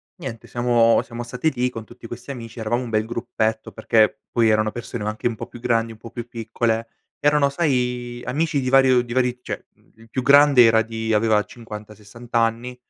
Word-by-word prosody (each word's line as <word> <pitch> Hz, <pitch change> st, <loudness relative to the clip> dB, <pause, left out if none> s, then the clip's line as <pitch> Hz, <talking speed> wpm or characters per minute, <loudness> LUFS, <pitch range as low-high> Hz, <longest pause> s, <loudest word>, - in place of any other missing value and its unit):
niente 115 Hz, -4 st, -8 dB
siamo 120 Hz, -1 st, +3 dB
siamo 120 Hz, 0 st, -8 dB
stati 125 Hz, +6 st, -1 dB
lì, 125 Hz, +1 st, 0 dB
con 115 Hz, -2 st, -8 dB
tutti 120 Hz, 0 st, -12 dB
questi 120 Hz, +4 st, -8 dB
amici. 120 Hz, -2 st, -9 dB
Eravamo 120 Hz, +3 st, -1 dB
un 120 Hz, -, -6 dB
bel 110 Hz, 0 st, 0 dB
gruppetto, 110 Hz, -2 st, -2 dB
perché 110 Hz, -1 st, +2 dB
poi 115 Hz, -2 st, +3 dB
erano 110 Hz, 0 st, +2 dB
persone 120 Hz, -2 st, -6 dB
anche 110 Hz, +3 st, -2 dB
un 115 Hz, -, -2 dB
po' -, -, -6 dB
più 120 Hz, -, -12 dB
grandi, 115 Hz, -1 st, 0 dB
un 110 Hz, -, -13 dB
po' 115 Hz, -, -10 dB
più 120 Hz, 0 st, -7 dB
piccole, 115 Hz, 0 st, -2 dB, 0.3 s
erano 145 Hz, -1 st, +3 dB
sai 125 Hz, -5 st, -1 dB
amici 145 Hz, +2 st, 0 dB
di 130 Hz, -, -1 dB
vario 130 Hz, -2 st, +5 dB
di 120 Hz, -1 st, -7 dB
vari 125 Hz, -1 st, +1 dB
cioè -, -, -6 dB, 0.3 s
il 115 Hz, 0 st, -18 dB
più 130 Hz, 0 st, -3 dB
grande 140 Hz, -2 st, +7 dB
era 115 Hz, -1 st, +5 dB
di 110 Hz, 0 st, -3 dB
aveva 105 Hz, -1 st, +3 dB
50, 105 Hz, -2 st, -10 dB
60 115 Hz, +3 st, -15 dB
anni. 115 Hz, +2 st, 0 dB
120 Hz, 200 wpm, -22 LUFS, 115-125 Hz, 0.3 s, grande